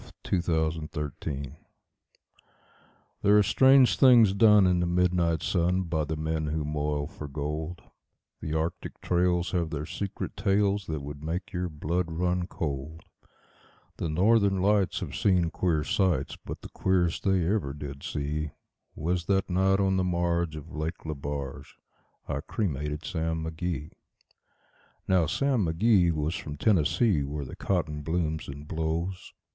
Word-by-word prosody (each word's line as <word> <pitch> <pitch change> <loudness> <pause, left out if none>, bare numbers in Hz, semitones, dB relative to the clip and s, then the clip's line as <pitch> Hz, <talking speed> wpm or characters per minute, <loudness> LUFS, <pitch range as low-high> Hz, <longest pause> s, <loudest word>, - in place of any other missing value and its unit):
The - - -10
Cremation 85 -1 -1
of 80 0 +1 0.2
Sam 75 -1 -3
Mcgee 70 -2 -5 1.7
There 105 +1 +5
are 105 - +6
strange 130 +4 +5
things 120 -7 +7
done 105 -1 +6
in 90 -1 +3
the 85 - +1
midnight 85 -2 +1
sun 90 +1 +1
By 80 -3 -1
the 80 - -3
men 80 0 -2
who 75 0 -2
moil 75 -1 -1
for 75 -1 -8
gold; 75 +4 -4 0.6
The 80 0 -4
Arctic 80 +2 -3
trails 90 0 +1
have 85 -3 0
their 75 -1 -4
secret 100 +5 -5
tales 100 -1 +1
That 80 -3 -3
would 70 0 -7
make 85 +4 -4
your 90 0 -2
blood 85 +3 -2
run 90 +2 0
cold; 80 0 -5 0.9
The 85 - -2
Northern 100 +3 +3
Lights 100 0 +2
have - - -5
seen 90 -5 +2
queer 80 -5 0
sights, 85 -9 0
But - - -8
the - - -8
queerest 90 -3 +1
they 95 -3 +2
ever 95 -6 0
did 70 -1 -7
see 75 +1 -3 0.5
Was 85 +2 -1
that 95 0 +1
night 95 +2 +3
on 95 -1 +2
the 95 - +2
marge 85 -2 0
of 75 +2 -9
Lake 80 +3 -4
Lebarge 70 -3 -5 0.5
I 70 -1 -2
cremated 75 -6 -3
Sam 80 -1 -2
McGee. 80 -1 -4 1.2
Now 90 -4 +3
Sam 130 - +1
McGee 90 +1 +3
was 75 0 -1
from 75 -4 -6
Tennessee, 95 0 +2
where 70 +1 -4
the - - -8
cotton 80 -6 -1
blooms 80 0 -2
and 70 +1 -8
blows. 85 +4 -3
85 Hz, 150 wpm, -28 LUFS, 75-95 Hz, 1.7 s, things